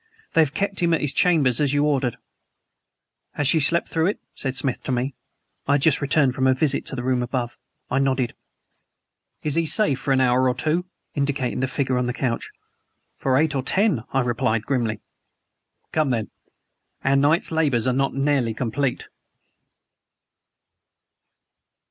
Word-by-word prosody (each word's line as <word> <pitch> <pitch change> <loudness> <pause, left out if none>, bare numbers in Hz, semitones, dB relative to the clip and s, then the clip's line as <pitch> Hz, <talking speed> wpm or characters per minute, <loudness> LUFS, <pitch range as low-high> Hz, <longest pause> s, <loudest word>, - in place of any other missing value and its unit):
"They 165 - +5
have 150 -2 0
kept 200 -1 -2
him 170 -1 +3
at - - -3
his 145 -2 +1
chambers 150 -8 +3
as 145 -2 +2
you 145 - +2
ordered." 135 -5 0 1.2
"Has 145 - 0
she 160 - +4
slept 165 +4 +3
through 160 +1 0
it?" 205 - -2
said 135 -1 -2
Smith 130 -1 -1
to - - -2
me. 130 +2 -1 0.5
(I 140 - +3
had 145 -1 +1
just 155 -4 +3
returned 140 -2 +2
from 130 0 +1
a 130 - +4
visit 140 +1 0
to - - -2
the 120 - -4
room 130 -1 +1
above.) 120 -1 -3 0.4
I 130 - +2
nodded. 130 -3 0 1.1
"Is 150 - +1
HE 165 +1 +1
safe 180 - +3
for 140 - -2
an 135 - +3
hour 130 0 +3
or 125 - -1
two?" 155 +7 0 0.3
indicating 140 -4 -1
the 130 - 0
figure 130 -1 -1
on 125 - -1
the 125 - -2
couch. 120 -4 -2 0.7
"For 130 -1 +1
eight 155 +1 +2
or 135 - 0
ten," 190 - +1
I 135 - +2
replied 115 -2 -1
grimly. 115 -6 -1 0.9
"Come, 155 -3 +1
then. 115 -4 -2 0.7
Our 135 +1 +2
night's 145 +5 +2
labors 145 -8 +1
are 130 - +2
not 135 +1 0
nearly 135 -5 +1
complete." 125 +2 -2
135 Hz, 170 wpm, -23 LUFS, 125-150 Hz, 1.2 s, They